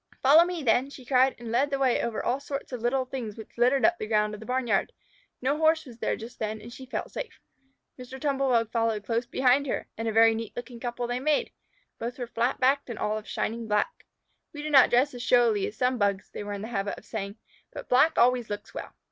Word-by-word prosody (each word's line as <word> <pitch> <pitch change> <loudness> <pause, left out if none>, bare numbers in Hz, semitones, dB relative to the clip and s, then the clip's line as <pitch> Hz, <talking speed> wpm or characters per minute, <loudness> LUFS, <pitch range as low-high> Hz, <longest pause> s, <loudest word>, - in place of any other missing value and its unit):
"Follow 295 +5 +8
me 350 -3 -4
then," 250 +3 +2
she 265 -2 -12
cried, 260 +1 +3
and 235 -2 -7
led 270 +5 +2
the 275 - -1
way 265 -2 +2
over 235 -2 -3
all 250 +3 +1
sorts 280 0 -6
of 250 -3 -5
little 255 +2 +1
things 240 -5 -6
which 220 - -11
littered 250 +3 +3
up 350 +1 +3
the 215 - -4
ground 210 -1 +1
of 210 - -7
the 220 - -11
barnyard. 250 -5 0 0.5
No 280 +3 +1
Horse 315 0 +3
was 240 -3 -13
there - - 0
just 230 +2 -10
then, 215 0 -3
and 230 +3 -11
she 260 +1 -10
felt 260 - -4
safe. 460 - -7 0.6
Mr. 255 +1 -9
Tumble 275 -1 0
bug 230 -3 +2
followed 225 -3 0
close 230 +2 -1
behind 265 +2 +2
her, - - -2
and 225 - -2
a - - +1
very 225 +1 +6
neat 225 0 -5
looking 245 -1 -7
couple 240 0 -3
they 245 +1 -2
made. 300 +2 +1 0.5
Both 240 +2 -4
were 245 - -3
flat 240 +2 -1
backed 270 +1 +2
and 235 - -5
all 210 0 -1
of 215 -1 -6
shining 230 0 -3
black. 210 - -1 0.5
"We 295 0 -7
do 305 - -3
not 270 -3 +7
dress 255 +4 +3
so 245 - -9
showily 240 -5 +3
as 210 - -9
some 250 0 +1
Bugs," 200 -2 0
they - - -6
were 205 0 -5
in 200 0 -5
the 220 - -6
habit 200 -3 -2
of - - -14
saying, 200 -2 -5 0.4
"but - - -8
black 280 +6 +4
always 245 -1 +3
looks 205 0 -6
well." - - -7
245 Hz, 245 wpm, -27 LUFS, 225-265 Hz, 0.6 s, Follow